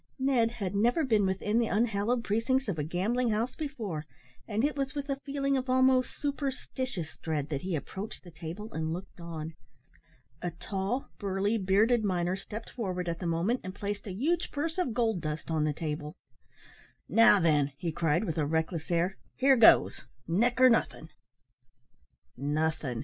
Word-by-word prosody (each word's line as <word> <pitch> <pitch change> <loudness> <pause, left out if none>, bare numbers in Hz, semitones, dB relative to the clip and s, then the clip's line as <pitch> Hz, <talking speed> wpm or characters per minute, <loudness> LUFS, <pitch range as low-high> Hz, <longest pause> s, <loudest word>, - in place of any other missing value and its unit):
Ned 260 -4 +2
had 200 -5 -3
never 240 +10 +2
been 215 -6 +3
within 205 +4 0
the 235 - +2
unhallowed 225 +2 +1
precincts 235 +5 +1
of 180 -6 -2
a - - 0
gambling 210 +10 0
house 225 +3 0
before, 220 - -4 0.4
and 220 +1 0
it 295 +1 +1
was 275 -1 -2
with 285 0 -4
a 270 - -2
feeling 275 -1 0
of 260 -1 -2
almost 260 0 +3
superstitious 265 - -3
dread 150 -3 -2
that 140 -3 -2
he 185 -2 -2
approached 195 +8 -6
the 175 - -12
table, 175 +7 -7
and 160 0 -2
looked 180 +1 -8
on. 160 -1 -6 0.9
A 175 - -1
tall, 190 +8 -3
burly, 200 +3 0
bearded 215 +5 +3
miner 180 -2 0
stepped 210 +3 -8
forward 185 -7 -3
at 170 0 -2
the 180 - -3
moment 175 +10 +1
and 185 +1 -6
placed 205 0 -4
a - - -4
huge 310 - 0
purse 320 +4 -2
of 260 -11 -1
gold 225 -7 +1
dust 155 +1 -4
on 155 -1 +1
the 155 - +1
table 150 0 -4 0.9
"Now, 225 -3 +6
then," 150 -5 +3
he 165 +2 -2
cried, 160 +2 +1
with 165 -6 -2
a 150 - +2
reckless 160 +1 -1
air, 175 +2 +1 0.2
"here 270 +1 +5
goes 230 -3 +6 0.3
neck 235 +9 +2
or 255 - +8
nothin'." 230 - 0 1.3
"Nothin'!" 145 -2 -1
200 Hz, 170 wpm, -30 LUFS, 165-245 Hz, 1.3 s, or